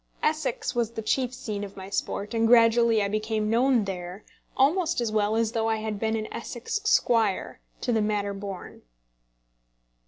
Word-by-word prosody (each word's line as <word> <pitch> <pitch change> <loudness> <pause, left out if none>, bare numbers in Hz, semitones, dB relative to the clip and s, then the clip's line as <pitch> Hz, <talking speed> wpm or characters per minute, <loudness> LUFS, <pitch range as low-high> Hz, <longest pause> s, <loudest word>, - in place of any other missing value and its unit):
Essex 305 -5 -1
was 235 -2 0
the 225 -1 -6
chief 250 +3 0
scene 215 -5 -5
of 200 -1 -9
my 190 0 -7
sport, 200 +2 -3
and 225 0 +2
gradually 230 -1 +5
I - - 0
became 215 +1 -1
known 245 0 +3
there 180 +1 -6 0.3
almost 315 +5 +2
as 235 -3 -1
well 215 0 +1
as 225 -1 +1
though 225 -1 0
I 225 - +2
had 215 -1 -4
been 220 +1 0
an 215 -1 -2
Essex 240 - -4
squire, 225 - +2 0.2
to 250 - -1
the 225 -2 +2
manner 205 -1 -1
born. 195 -2 -8
225 Hz, 175 wpm, -26 LUFS, 210-240 Hz, 0.3 s, gradually